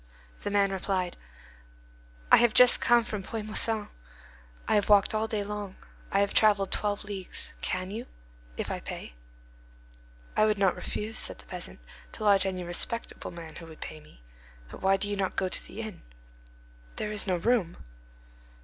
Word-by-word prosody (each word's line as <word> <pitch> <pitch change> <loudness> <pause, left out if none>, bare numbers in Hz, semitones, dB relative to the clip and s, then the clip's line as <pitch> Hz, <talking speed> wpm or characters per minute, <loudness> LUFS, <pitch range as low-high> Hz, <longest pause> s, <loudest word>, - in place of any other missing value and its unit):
The - - -3
man 200 -1 +3
replied: 185 -2 -1 1.2
"I - - +10
have 240 -2 +4
just 250 -1 +7
come 240 0 +5
from 215 -3 -4
Puy 220 +3 -5
Moisson. 215 0 +1 0.8
I - - +2
have 205 -1 +2
walked 205 0 +6
all 215 +1 0
day 215 -2 -1
long. 205 -2 -5 0.4
I 195 - +3
have 200 - +1
travelled 205 -3 +4
twelve 205 0 0
leagues. 200 -3 -3
Can 185 +1 -2
you?—if - - -8
I - - -2
pay?" - - -7 1.2
"I 215 - +5
would 215 -1 +2
not 195 -2 +3
refuse," 220 +1 -3
said - - -1
the - - -13
peasant, - - -5 0.3
"to 220 - -6
lodge 200 -2 +5
any 185 -1 -3
respectable 175 +6 -3
man 165 -2 -9
who 165 - -10
would 160 -1 -12
pay 155 - -7
me. - - -19 0.5
But - - -10
why 195 0 +4
do 205 - -2
you 205 - -1
not 195 -2 -1
go 190 - +1
to - - -1
the 225 - -7
inn?" 220 -4 -7 0.9
"There 210 - -3
is 210 0 0
no 185 - +2
room." 195 -3 +1
200 Hz, 175 wpm, -29 LUFS, 185-215 Hz, 1.2 s, I